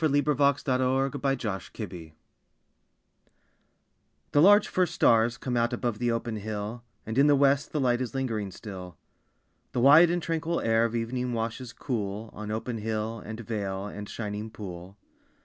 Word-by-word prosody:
Other - - +5 0.2
Poems 140 -1 +2
An 130 -2 +1
Evening 135 +1 +1 0.6
Communion 85 -7 -8 2.2
The 145 - +4
large 205 +4 +7
first 180 -2 0
stars 115 +2 +4
come 125 -2 -3
out 120 +1 +1
Above 120 -3 -2
the 120 0 +1
open 115 -1 -2
hill, 105 +2 -5 0.2
And 110 +4 -1
in 140 - +6
the 145 - +6
west 140 0 +3
the 150 - -1
light 125 -2 +2
Is 125 0 -4
lingering 115 -7 -2
still. 95 -3 -9 0.8
The - - 0
wide 150 +7 +8
and 175 +1 +1
tranquil 165 0 -1
air 115 0 +3
Of 115 0 -2
evening 125 +2 -2
washes 115 +2 -3
cool 110 -4 -4
On 105 0 -7
open 110 +2 -3
hill, 110 +1 -3
and 110 +1 -7
vale, 100 -3 -3
And 105 0 -7
shining 105 0 -5
pool. 95 -3 -9
115 Hz, 160 wpm, -28 LUFS, 105-135 Hz, 2.2 s, wide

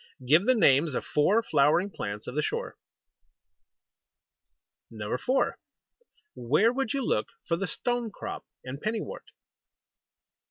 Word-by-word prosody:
Give 160 - +4
the 255 - +5
names 150 - +4
of - - -2
four 205 +10 +2
flowering 155 +6 +3
plants 100 - -5
of - - -6
the 150 - 0
shore. - - -3 2.1
4. 120 - -1 0.7
Where 150 - +2
would 270 -4 -1
you 275 -3 -1
look 105 - 0 0.2
for 170 - +2
the 195 +3 -3
Stone 240 +2 -1
crop 200 - -7 0.2
and 130 +3 -7
Penny 215 0 -1
wort? - - -8
170 Hz, 125 wpm, -28 LUFS, 135-225 Hz, 2.1 s, the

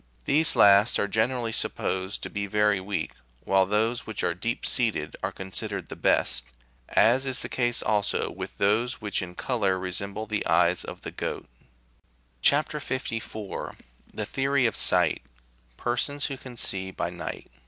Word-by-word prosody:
These 155 +3 +4
last 100 +2 +6
are 100 - +1
g 100 +2 -1
enerally 120 -1 0
supposed 95 -2 -1
to - - -4
be 100 0 -3
very 105 0 +2
weak, 95 +2 -3 0.3
while 95 -1 +3
those 110 +3 0
which 110 - -4
are 85 - +1
deep 115 +7 -3
seated 110 - 0
are - - -2
considered 95 0 -3
the - - -6
best, 65 -1 +1 0.5
as 130 +4 +4
is 130 -1 +2
the - - -5
case 120 -2 0
also 105 -2 +1
with - - -7
those 115 +6 +1
which 105 -2 0
in 90 -1 -7
colour 100 -7 0
resemble 100 +3 -4
the 105 -1 -2
eyes - - +3
of - - -8
the - - -5
goat. - - -5 0.9
CHAP. 145 +2 +4
54.— 115 -7 -4 0.4
THE - - -4
THEORY 135 -1 +1
OF 115 - +2
SIGHT— - - +3 0.6
PERSONS 140 +4 -1
WHO 135 - -3
CAN 130 -2 -11
SEE 95 -3 0
BY 95 - -3
NIGHT. 85 -7 -7
110 Hz, 165 wpm, -26 LUFS, 95-125 Hz, 0.9 s, last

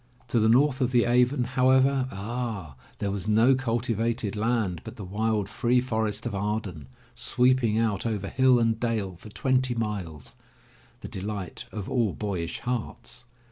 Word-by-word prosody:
To 120 - +2
the, 110 0 +3
north 135 +3 +4
of 125 - +2
the 120 -2 +3
Avon, 125 +2 +3
however 130 +1 +3
— - - -12
Ah! 105 - -4 0.2
there 100 - -2
was 100 0 -3
no 110 +5 +5
cultivated 115 -3 -1
land, 105 -6 0
but - - -9
the 105 - -8
wild, 105 +1 -1
free 120 +4 +1
forest 110 -3 -1
of 120 - -3
Arden, 100 -7 -3 0.3
sweeping 125 -3 +2
out 110 -2 0
over 105 -4 -2
hill 130 -1 +4
and 115 -1 +1
dale 110 -6 -1
for 95 +5 -12
twenty 130 +2 +1
miles, 90 - -4 0.7
the - - -6
delight 100 +2 -5
of 105 -3 -5
all 115 -6 +1
boyish 95 -6 -4
hearts. 120 0 -5
115 Hz, 160 wpm, -27 LUFS, 100-125 Hz, 0.7 s, no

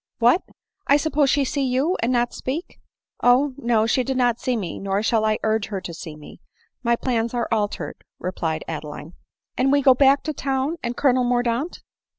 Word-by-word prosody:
" - - -67
What 245 +9 +4 0.3
— 395 - -45
I.suppose 290 0 +3
she 280 +1 +2
see 280 +2 -2
you, 265 +8 +1
and 235 - +1
not 240 -1 +1
speak 305 +8 -5
?" - - -69
" - - -70
Oh, 260 +3 +4
no; 230 -4 +2
she 250 +3 +2
did 265 0 -2
not 245 -2 +2
see 255 -2 -1
me, 190 -6 -4
nor 195 +1 -1
shall 220 -1 +2
I 215 0 +2
urge 220 -1 +1
her 200 -3 -4
to 180 -2 -7
see 160 -1 -8
me; 150 -1 -13 0.4
my 235 -1 +2
plans 235 -1 -1
are 235 -1 0
altered," 210 -2 -2
replied 165 -3 -3
Adeline. 150 +1 -7 0.2
" - - -56
And 265 +1 +3
we 285 0 +3
go 265 -1 +7
back 275 +2 +4
to 310 - -3
town 275 +3 -1
and 235 0 -4
Colonel 255 -3 +3
Mordaunt 245 +5 -1
245 Hz, 210 wpm, -23 LUFS, 220-270 Hz, 0.4 s, go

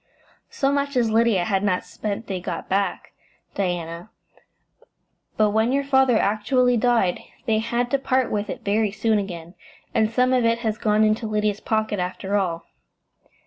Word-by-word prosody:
"So 275 0 0
much 280 -1 -1
as 230 -3 +2
Lydia 220 -5 +3
had 195 -1 0
not 185 -3 0
spent 210 +1 -5
they 190 -2 -4
got 180 - -5
back, 195 +1 -1 0.4
Diana; 175 -1 -3 1.3
but 215 -1 +3
when 220 +3 +2
your 280 +1 +1
father 265 -4 +3
actually 245 +5 +2
died 230 -6 +2 0.3
they 220 -1 +2
had 240 +2 -1
to 275 - +2
part 260 -1 0
with 205 0 -2
it - - -6
very 210 +1 +2
soon 215 +1 +1
again, 175 -3 -6 0.4
and 220 -1 +2
some 250 +3 +2
of 250 -2 +3
it 230 0 +2
has 220 -1 -1
gone 215 0 +2
into 215 +1 +1
Lydia's 210 -1 0
pocket 220 -2 -1
after 185 +2 -3
all." 175 -5 -1
215 Hz, 165 wpm, -23 LUFS, 200-240 Hz, 1.3 s, Lydia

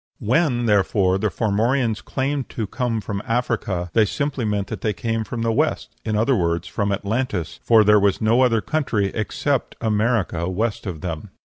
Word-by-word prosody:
When, 125 0 +1
therefore, 95 -2 +2
the 105 +1 +1
Formorians 110 +3 0
claimed 135 0 -2
to 110 - -3
come 115 +1 -2
from 100 -1 -4
Africa, 115 -7 -1
they 110 -2 +5
simply 140 +2 -2
meant 105 -2 0
that 110 -5 -5
they 110 - 0
came 115 +2 -2
from 115 +1 -4
the 115 - +1
West - - -1
in 110 -1 -1
other 115 +5 +3
words, 85 -3 0
from 100 -1 -1
Atlantis 100 -4 -2
for 115 -2 +5
there 105 0 +6
was 100 -1 +2
no 115 +3 +3
other 115 -4 +3
country 110 -11 0
except 130 +5 -1
America 105 -6 0
west 105 +3 -2
of 85 -5 -5
them. 80 -4 -5
110 Hz, 175 wpm, -22 LUFS, 100-120 Hz, -, there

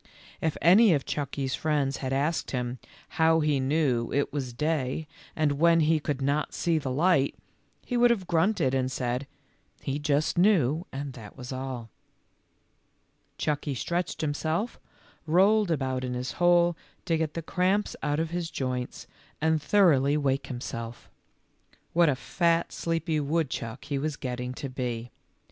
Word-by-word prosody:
If 160 -2 0
any 190 +2 +7
of 140 - -2
Chucky's 140 -2 -3
friends 145 -2 0
had 130 -1 -4
asked 145 +5 0
him 125 -1 -3 0.2
" - - -24
how 160 0 +5
he 150 -2 +2
knew 130 -4 +1
it 140 0 0
was 135 -4 -3
day 150 +2 -1 0.3
when 160 +2 +3
he 155 +1 +3
could 145 -2 -3
not 145 +2 0
see 170 -2 +1
the 140 - -4
light," 140 +1 +2 0.5
he 245 - -1
would 240 0 +6
have 215 -6 +1
grunted 170 -5 +2
and 130 -1 0
said, 125 +1 -2 0.3
" - - -39
he 140 +2 -2
just 150 +2 +1
knew 175 - +3
and 135 0 -5
that 110 -2 -11
was 125 0 -7
all." 130 -4 -5 1.5
Chucky 145 -2 -1
stretched 170 +6 -2
himself, 160 +8 -2 0.5
rolled 195 +5 +4
about 130 -5 -1
in 125 -1 -3
his 125 +1 -3
hole, 175 0 +3 0.3
to 165 - +1
get 160 -1 -2
the 165 - -3
cramps 190 +5 0
out 145 0 0
of 165 0 -2
his 175 -1 -2
joints, 125 -3 -4 0.3
and 160 -1 +2
thoroughly 150 -6 +4
wake 135 -2 0
himself. 120 -2 -6 0.8
What 170 -1 +5
a 140 - +2
fat, 170 +4 +1
sleepy 165 -1 -1
woodchuck 140 -5 -2
he 140 -1 -2
was 150 +1 -2
getting 125 -1 -4
to 140 - -5
be 125 -3 -4
145 Hz, 155 wpm, -27 LUFS, 130-165 Hz, 1.5 s, any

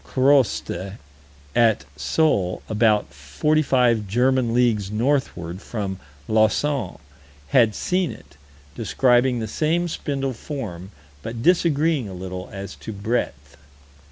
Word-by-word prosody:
Croste, 130 -7 +1 0.6
at 110 -9 +3
Sole, 90 - 0
about 110 -1 +2
forty 75 - 0
five 120 -7 +2
German 125 +3 +2
leagues 115 -5 +2
northward 105 - -1
from 100 -5 -4 0.3
Lausanne, 110 +1 +1 0.5
had 115 - +4
seen 180 -1 0
it, - - -14 0.4
describing 125 0 +2
the 110 -1 -3
same 160 +9 0
spindle 135 -4 -3
form, 105 - -6 0.3
but 115 +4 -6
disagreeing 160 - +2
a 95 - -8
little 90 0 -6
as 100 -1 -7
to - - -7
breadth. 100 - -3
115 Hz, 110 wpm, -23 LUFS, 95-135 Hz, 0.6 s, had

